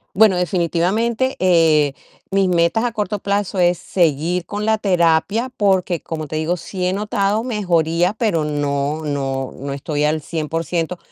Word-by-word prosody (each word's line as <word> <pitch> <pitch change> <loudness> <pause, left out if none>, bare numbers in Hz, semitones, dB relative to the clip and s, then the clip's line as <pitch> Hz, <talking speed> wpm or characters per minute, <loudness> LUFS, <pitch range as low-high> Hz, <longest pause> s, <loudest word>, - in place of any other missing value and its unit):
Bueno, 210 -1 +5
definitivamente, 190 +8 0
eh, 165 -5 +4 0.4
mis 195 -1 +2
metas 175 +6 +2
a 240 - -1
corto 210 -1 -2
plazo 200 0 -2
es 175 -1 +3
seguir 170 +1 0
con 205 0 -4
la 220 0 +2
terapia, 190 +5 +1
porque, 190 -4 +1
como 155 -1 -5
te 155 - -5
digo, 160 +3 0
sí 180 +1 -4
he 180 - +1
notado 205 +1 0
mejoría, 175 -5 +1
pero 210 -9 0
no 145 0 -1
no 135 -2 -2
no 140 +1 -6
estoy 145 +1 -2
al 155 +1 +1
100% 165 +2 -3
175 Hz, 150 wpm, -19 LUFS, 155-200 Hz, 0.4 s, Bueno